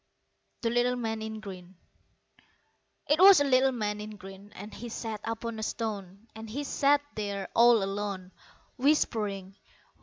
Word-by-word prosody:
The 230 - +1
Little 245 +1 +2
Man 225 -2 -3
in 220 0 -5
Green 185 -3 -10 1.4
'TWAS 380 +2 +8
a - - +3
little 265 -1 +4
man 210 -4 -3
in 215 0 -7
green, 195 +1 -12
And 205 +2 -9
he 240 - -7
sat 220 -2 -5
upon 225 0 -4
a - - -4
stone; 205 -2 -5
And 220 0 -9
he 280 +7 -4
sat 285 +1 +2
there 200 -2 -4
all 235 -2 +6
alone, 195 -2 -4 0.5
Whispering. 210 -9 0
220 Hz, 145 wpm, -29 LUFS, 200-240 Hz, 1.4 s, TWAS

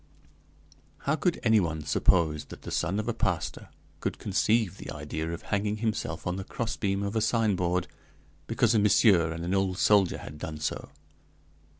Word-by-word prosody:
"How 140 - +2
could 175 +1 0
anyone 90 -9 +2
suppose 80 -2 +2
that - - -12
the - - -7
son 95 +5 0
of 110 - -3
a - - 0
pastor - - -2 0.3
could - - -3
conceive 110 -4 +1
the - - -8
idea 80 +1 -4
of 85 - -6
hanging 105 +1 -1
himself 105 -7 -2
on 90 +1 -1
the 95 - -4
crossbeam 100 -3 -2
of 100 +2 -3
a 110 - +2
signboard, 95 -6 +1 0.6
because 115 0 +2
a 110 - +4
big - - +2
monsieur 95 -5 +5
and 85 +1 -5
an 90 - -1
old 95 -1 +1
soldier 100 -2 +4
had 75 - -9
done 75 0 -5
so? 75 -1 -3
95 Hz, 175 wpm, -28 LUFS, 85-110 Hz, 0.6 s, monsieur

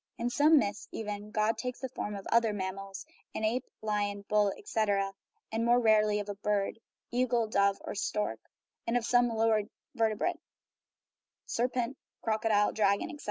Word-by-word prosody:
In 240 +1 -1
some 305 +4 +6
myths, 205 -6 0
even, 210 -1 -5
God 215 +1 +1
takes 250 -1 -4
the 260 - -3
form 210 -4 -4
of 195 - -7
other 230 -2 +4
mammals 195 0 -5 0.3
(an - - -3
ape, 240 +4 0
lion, 205 -1 -1
bull, 210 -1 +3
etc.), 205 - 0 0.4
and 225 +1 0
more 240 +1 +5
rarely 215 -2 +4
of 205 - -4
a 205 - -3
bird 205 +1 -1 0.3
(eagle, 240 -1 +2
dove, 200 -2 +2
or - - -5
stork), 210 +1 -1 0.5
or 230 - +1
of 235 - -1
some 245 0 +4
lower 225 -1 +3 0.3
vertebrate 230 +8 0 1.1
(serpent, 250 +2 -1 0.2
crocodile, 215 -1 +2
dragon, 200 +3 +1
etc.). 300 - -10
215 Hz, 160 wpm, -31 LUFS, 205-240 Hz, 1.1 s, some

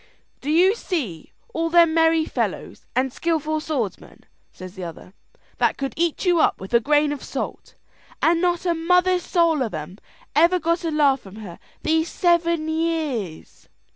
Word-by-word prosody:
"Do 285 - -6
you 355 +6 +5
see 280 - -4 0.2
all 330 0 -1
them 335 -1 +5
merry 325 -1 +3
fellows - - -4
and 255 0 0
skilful 310 -1 -1
swordsmen," 275 -10 -4 0.3
says 185 0 -10
the 190 -2 -8
other, 170 +2 -9 0.5
"that - - +2
could 275 -1 -3
eat 340 +2 -1
you 350 -2 +3
up - - +2
with 190 +4 -9
a 235 - +6
grain 295 +4 +2
of 290 - -5
salt, - - -6 0.4
and 335 +1 +3
not 350 -1 0
a 345 - +2
mother's 360 +2 +2
soul 335 -4 +2
of 225 -8 -2
'em 155 +6 -7 0.4
ever 340 +4 +5
got 335 +1 0
a 330 - -1
laugh 290 -3 +3
from 195 -3 -14
her 200 -6 -10 0.2
these 320 +1 +1
seven 335 -2 +1
years?" 315 - -3
315 Hz, 170 wpm, -22 LUFS, 255-335 Hz, 0.5 s, a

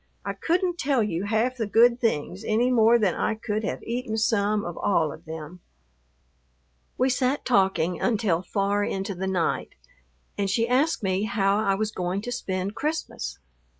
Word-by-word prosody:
I - - -2
couldn't 350 0 0
tell 270 -5 +2
you 195 -2 -2
half 225 +5 0
the 225 -3 -1
good 235 +3 +5
things 195 -3 -1
any 230 +4 +2
more 230 -1 +5
than 205 -6 +2
I 220 - -1
could 215 0 -3
have - - -3
eaten 235 -1 -3
some 210 -1 +1
of 175 -1 -5
all 165 -6 +1
of - - -14
them. 160 +2 -8 1.4
We 255 - +3
sat 260 +2 0
talking 190 -7 +2
until 200 -7 +1
far 200 +2 0
into 195 0 -2
the 190 +1 -4
night, 185 -3 -1 0.6
and 200 -1 +1
she 230 +4 +1
asked 265 +3 +1
me 190 +1 0
how 200 -1 +1
I 195 -2 +2
was 215 +1 -1
going 180 +1 -2
to 245 - -4
spend 190 -5 -3
Christmas. 295 - -3
210 Hz, 170 wpm, -25 LUFS, 190-240 Hz, 1.4 s, good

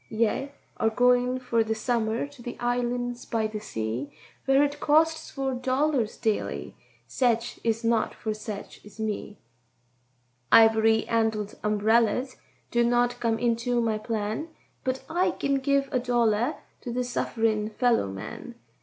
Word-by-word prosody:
"Ye 230 +5 0 0.3
are 220 - +2
goin' 250 +2 +3
for 235 -3 +1
the 220 0 -2
summer 225 0 0
to 285 -3 -14
the 240 0 -7
islands 245 0 -1
by 225 -1 -1
the 215 0 -3
sea, 115 - -4 0.3
Where 270 +1 +5
it 290 0 -1
costs 320 +2 +2
four 270 -1 -2
dollars 255 -1 0
daily—setch 230 +1 -2
is 225 0 0
not 230 0 +1
for 220 - -3
setch 215 -1 -7
as 210 +1 -15
me; 210 -1 -3 1.1
Iv'ry 225 0 +6
handled 220 -2 0
umberellers 220 +4 +2 0.3
do 240 0 +3
not 245 +1 +2
come 230 -1 +1
into 240 +1 0
my 225 -2 0
plan, 215 +5 -3 0.4
But 260 0 -2
I 360 +3 +1
kin 275 -1 +1
give 275 0 +1
a 255 - +2
dollar 240 +1 +1 0.3
to 245 - -5
this 250 +1 -2
suff'rin' 220 -2 0
fellow 235 - +2
man. 95 0 -8
235 Hz, 140 wpm, -27 LUFS, 220-250 Hz, 1.1 s, Iv'ry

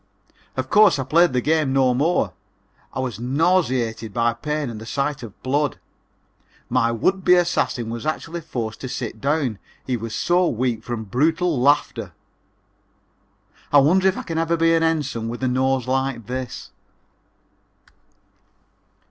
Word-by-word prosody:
Of 130 0 -1
course 210 -6 +6
I 135 - -1
played 165 +5 +4
the 125 -1 0
game 155 -1 +1
no 130 -2 +3
more. 135 - +1 0.6
I - - -5
was 125 -4 -3
nauseated 130 - 0
by 115 0 +2
pain 150 +4 -3
and 110 -1 -8
the - - -8
sight 140 +1 -2
of 115 -5 -10
blood. 145 +3 0 0.9
My 115 -2 +2
would 185 - 0
be 180 - +6
assassin 170 -9 0
was 115 -1 -5
actually 165 +2 -3
forced 115 -8 -5
to 130 - -5
sit 120 -4 -5
down, 140 -7 0 0.3
he 125 -2 -1
was 115 0 -5
so 175 +1 +2
weak 120 -3 -1
from 120 -2 -4
brutal 155 - +1
laughter. 145 +3 +1 1.6
I 145 - +6
wonder 180 +7 +5
if 190 - +1
I - - -4
can 165 -2 -3
ever 165 +1 +1
be 165 0 +3
an 165 - +3
Ensign 145 -8 -1
with 120 +2 -6
a - - +2
nose 130 0 +1
like 130 -3 -1
this? 125 +1 -6
130 Hz, 155 wpm, -22 LUFS, 120-160 Hz, 1.6 s, course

